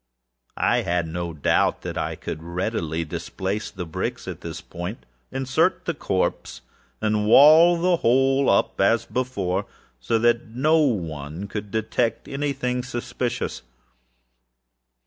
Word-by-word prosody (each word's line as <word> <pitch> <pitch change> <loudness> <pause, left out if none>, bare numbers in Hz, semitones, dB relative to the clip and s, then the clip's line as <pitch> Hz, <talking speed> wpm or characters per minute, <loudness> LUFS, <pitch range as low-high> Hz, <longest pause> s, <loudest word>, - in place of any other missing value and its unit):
I - - +2
made 85 0 0
no 85 -1 -3
doubt 75 -3 +1
that - - -5
I - - -2
could 80 - -6
readily 85 -2 -2
displace 95 +6 -4
the 90 -1 -6
bricks 80 - -4
at - - -6
this 80 -1 -6
point, 90 +7 -7 0.3
insert 135 +7 +1
the 170 - -1
corpse, 95 -10 -2 0.4
and 105 -1 +1
wall 160 +8 +7
the 175 0 +3
whole 135 +1 +3
up 100 - +2
as 115 +4 +3
before, 100 -7 -2 0.3
so 115 - 0
that 120 +1 +2
no 125 - +1
eye 75 +6 -7
could 105 +1 -6
detect 110 +2 -1
any 140 +1 -2
thing 125 -2 -2
suspicious. 120 0 -3
110 Hz, 130 wpm, -24 LUFS, 90-130 Hz, 0.4 s, wall